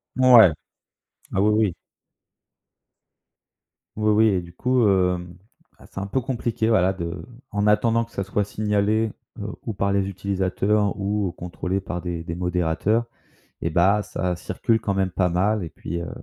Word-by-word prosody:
Ouais, 125 -7 +8 0.8
ah, 95 - +2
oui, 105 - +4
oui. 105 -3 +2 2.2
Oui, 110 0 +1
oui 110 +1 +5
et 95 -3 +1
du 85 0 -13
coup, 125 -1 +2
hem, 90 -2 +1 0.4
ah, - - -17
c'est - - -8
un 100 - -4
peu 130 - 0
compliqué, 120 -3 -2
voilà, 95 -4 +3
de 85 -2 -5 0.3
en 105 0 0
attendant 115 +2 +3
que 115 - -25
ça 100 - -3
soit 100 +2 -1
signalé, 105 +1 0 0.3
heu, - - -5 0.2
ou 110 - -1
par 100 +1 0
les 100 -1 +1
utilisateurs 100 +2 0
ou 100 -2 -1
contrôlé 90 +2 -3
par 90 -2 -5
des 85 -2 -4
des 85 - -5
modérateurs 90 +5 0 0.6
et 85 - 0
bah, 95 +6 +3
ça 90 -3 -3
circule 115 +5 0
quand 100 - -2
même 95 -1 0
pas 90 0 +1
mal, 100 +3 +1
et 80 - -7
puis, 85 +1 -5
heu 85 - -6
100 Hz, 165 wpm, -23 LUFS, 90-110 Hz, 2.2 s, Ouais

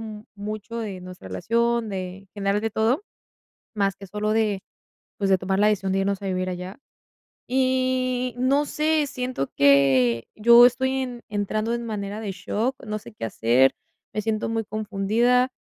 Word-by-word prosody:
mm, 215 -1 -8
mucho 215 +2 -6
de 200 -5 -5
nuestra 180 - -10
relación, 235 - 0
de, 185 -2 -4
en 195 -1 -19
general, 200 0 0
de 225 - -1
todo, 235 - +1 0.7
mas 200 -2 +1
que 195 - -10
solo 210 +2 -2
de, 215 -3 +1 0.6
pues, 200 -1 0
de 190 - +5
tomar 190 +2 -1
la 210 - +5
decisión 195 -2 +1
de 195 - +1
irnos 200 0 -1
a - - -6
vivir 185 -1 -1
allá. 180 +1 -6 0.7
Y 255 -1 +1
no 275 +4 +2
sé, 305 0 +1
siento 255 - -3
que 135 -4 +4
yo 235 +2 +8
estoy 260 +2 +2
en 245 -2 -5
entrando 215 +2 -1
en 235 0 -3
manera 205 -2 -4
de 210 -3 -4
shock, 220 +7 -2
no 215 -1 -3
sé 210 - -13
qué 215 - -10
hacer, 120 +4 +3 0.4
me 215 - -1
siento 220 0 -1
muy 225 -1 -1
confundida, 220 +5 +1
215 Hz, 175 wpm, -24 LUFS, 195-235 Hz, 0.7 s, yo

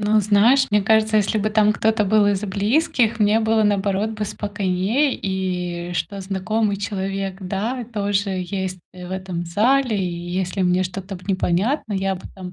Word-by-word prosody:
Ну, 210 +1 +3
знаешь, 220 +7 +4
мне 210 0 +3
кажется, 220 +1 +3
если 215 +1 +2
бы 215 +1 0
там 210 0 +4
кто-то 220 0 +1
был 210 +1 +3
из 200 0 0
близких, 220 +3 +1
мне 210 +1 +3
было, 220 -1 +2
наоборот, 205 +1 +1
бы 215 -1 -3
спокойнее. 205 +7 0
И 180 -2 -3
что 195 +3 -3
знакомый 200 +2 -1
человек, 195 -1 -3
да, 210 +7 -3
тоже 200 -1 0 0.2
есть, 190 -1 -3
э, 180 -1 -9
в - - -10
этом 185 -2 -4
зале. 225 +6 +2
И 190 - 0 0.3
если 185 +1 -1
мне 180 +1 +2
что-то, 190 +1 -6
б 180 - -15
непонятно, 200 - 0
я 195 0 0
бы 185 - -10
там 185 -1 -8
200 Hz, 175 wpm, -21 LUFS, 190-215 Hz, 0.3 s, знаешь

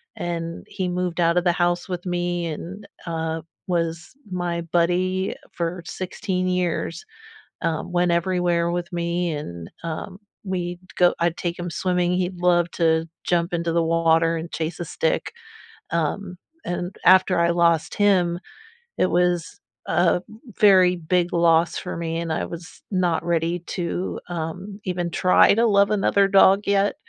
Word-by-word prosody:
and 170 -1 -4
he 185 - -3
moved 180 -1 -2
out 170 0 +3
of 175 - +3
the 175 - +4
house 175 +1 0
with 180 0 -4
me 175 -1 -1
and, 180 +6 -7 0.2
uh, 160 -1 -2 0.2
was 170 -1 -2 0.2
my 175 -2 -2
buddy 180 +3 0 0.2
for 170 +1 -3
16 185 0 -3
years, 180 - -1 0.6
um, 165 +1 -2
went 175 0 +2
everywhere 170 -1 +1
with 175 +1 -3
me, 170 0 -1
and, 85 - -6
um, 165 +3 -5 0.3
we'd 175 -2 -3 0.2
go 180 -1 +5
I'd 170 0 +1
take 175 0 -3
him 175 0 -4
swimming. 180 +1 0
He'd 180 0 -2
love 175 -1 +3
to 165 -1 +1 0.2
jump 175 0 +1
into 170 -1 -1
the 170 - +2
water 165 0 +2
and 165 +1 -5
chase 160 +1 -3
a - - -2
stick. 160 - -1 0.6
Um, 180 +3 -2 0.3
and 175 +1 -3
after 185 -1 +6
I 170 0 +3
lost 170 -2 +2
him, 185 -4 +3 0.6
it - - +3
was 175 -1 0 0.3
a 175 0 +2 0.4
very 185 -3 +6
big 175 +1 0
loss 170 0 +3
for 180 - -5
me, 165 0 -2
and 170 -1 -3
I - - -1
was 170 0 -10
not 180 -4 +1
ready 170 0 0
to, 175 +1 -3
um, 175 +4 -5
even 175 -2 -2
try 180 +2 +5
to 230 +2 +3
love 200 -2 +4
another 200 -1 +3
dog 195 0 +6
yet. 200 0 +2
175 Hz, 155 wpm, -23 LUFS, 170-180 Hz, 0.6 s, after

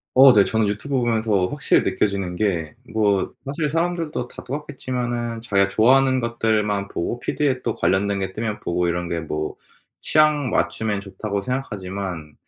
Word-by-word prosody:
어 130 0 +9
네. 105 -3 +6
저는 110 +1 +1
유튜브 110 +7 -2
보면서 110 -5 +1
확실히 - - +2
느껴지는 100 -3 -1
게 85 -6 -1 0.2
뭐 105 -3 +1
사실 145 +2 -2
사람들도 165 -4 -1
다 - - -11
똑같겠지만은 120 -4 -4
자기가 100 -4 +2
좋아하는 130 +5 +4
것들만 110 -4 0
보고 115 +8 -3
피드에 130 -1 0
또 115 - -2
관련된 100 +1 +1
게 95 -1 -3
뜨면 110 0 -3
보고 85 0 0
이런 85 0 -1
게 85 0 -2
뭐 75 -1 -4 0.5
'취향 150 -3 +3
맞추면 110 -2 0
좋다.'고 100 0 -4
생각하지만 95 - -4
110 Hz, 350 characters per minute, -22 LUFS, 100-130 Hz, 0.5 s, 어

